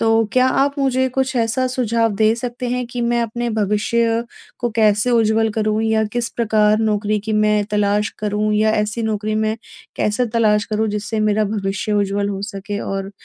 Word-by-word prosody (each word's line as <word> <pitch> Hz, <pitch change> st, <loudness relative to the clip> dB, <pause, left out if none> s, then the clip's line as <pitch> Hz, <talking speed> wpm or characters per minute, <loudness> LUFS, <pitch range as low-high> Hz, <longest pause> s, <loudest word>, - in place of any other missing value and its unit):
तो 225 Hz, 0 st, +3 dB
क्या 255 Hz, 0 st, +4 dB
आप 280 Hz, +1 st, +1 dB
मुझे 260 Hz, -1 st, +1 dB
कुछ 265 Hz, 0 st, -1 dB
ऐसा 240 Hz, +2 st, +1 dB
सुझाव 230 Hz, -3 st, 0 dB
दे 220 Hz, +1 st, +3 dB
सकते 245 Hz, +1 st, -4 dB
हैं 250 Hz, 0 st, -1 dB
कि 245 Hz, +1 st, -5 dB
मैं 235 Hz, 0 st, +1 dB
अपने 235 Hz, +1 st, -3 dB
भविष्य 220 Hz, +2 st, +1 dB, 0.4 s
को 240 Hz, -1 st, -1 dB
कैसे 215 Hz, +2 st, +3 dB
उज्ज्वल 225 Hz, -1 st, +3 dB
करूँ 215 Hz, 0 st, 0 dB
या 220 Hz, 0 st, +2 dB
किस 240 Hz, -1 st, -1 dB
प्रकार 215 Hz, -2 st, +2 dB
नौकरी 210 Hz, -1 st, 0 dB
की 220 Hz, +1 st, -4 dB
मैं 210 Hz, -1 st, +2 dB
तलाश 210 Hz, 0 st, +1 dB
करूँ 210 Hz, 0 st, -1 dB
या 215 Hz, +1 st, +3 dB
ऐसी 210 Hz, +2 st, -3 dB
नौकरी 215 Hz, -1 st, -2 dB
में 220 Hz, 0 st, 0 dB, 0.4 s
कैसे 220 Hz, +4 st, 0 dB
तलाश 210 Hz, -2 st, +3 dB
करूँ 215 Hz, +1 st, 0 dB
जिससे 210 Hz, +1 st, -3 dB
मेरा 215 Hz, 0 st, +2 dB
भविष्य 200 Hz, 0 st, -2 dB
उज्ज्वल 200 Hz, 0 st, 0 dB
हो 195 Hz, 0 st, -4 dB
सके? 205 Hz, 0 st, -5 dB
और 195 Hz, 0 st, -4 dB
220 Hz, 180 wpm, -19 LUFS, 210-235 Hz, 0.4 s, क्या